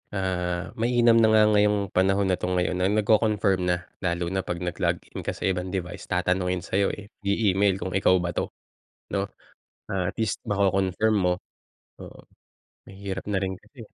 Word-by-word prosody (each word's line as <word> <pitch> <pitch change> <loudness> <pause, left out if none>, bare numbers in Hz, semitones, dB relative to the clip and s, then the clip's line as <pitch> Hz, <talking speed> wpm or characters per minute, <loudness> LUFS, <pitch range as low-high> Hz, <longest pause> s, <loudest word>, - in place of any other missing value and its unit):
ah, 90 -2 -2
mainam 120 0 +4
na 110 - +5
nga 110 0 +6
ngayong 105 0 +4 0.2
panahon 95 +1 +3
na 90 - +1
'to - - -2
ngayon 90 0 0
na 90 - +2
nagko-confirm 105 -2 +2
na. 90 - +3 0.3
Lalo 85 0 0
na 95 - 0
'pag 85 - -3
nag-log 90 - 0
in - - -6
ka - - 0
sa - - -8
ibang 90 0 -2
device, 90 -2 -4
tatanungin 90 0 0
sa'yo, 100 +1 +2
eh, 105 - -9 0.2
i-email 100 -1 +3
kung 95 - -4
ikaw 95 -1 +4
ba 85 - -1
'to, - - 0 0.7
'no? 100 - +1 0.7
Ah, 95 -1 -1
at - - -20
least 110 -2 0
mako-confirm 100 +1 +2
mo. 90 - +3 0.7
Oo. - - -11 0.7
Mahirap 95 -1 -6
na 100 -2 0
rin 95 -1 -2
kasi. 115 +4 -16
95 Hz, 170 wpm, -25 LUFS, 90-105 Hz, 0.7 s, nga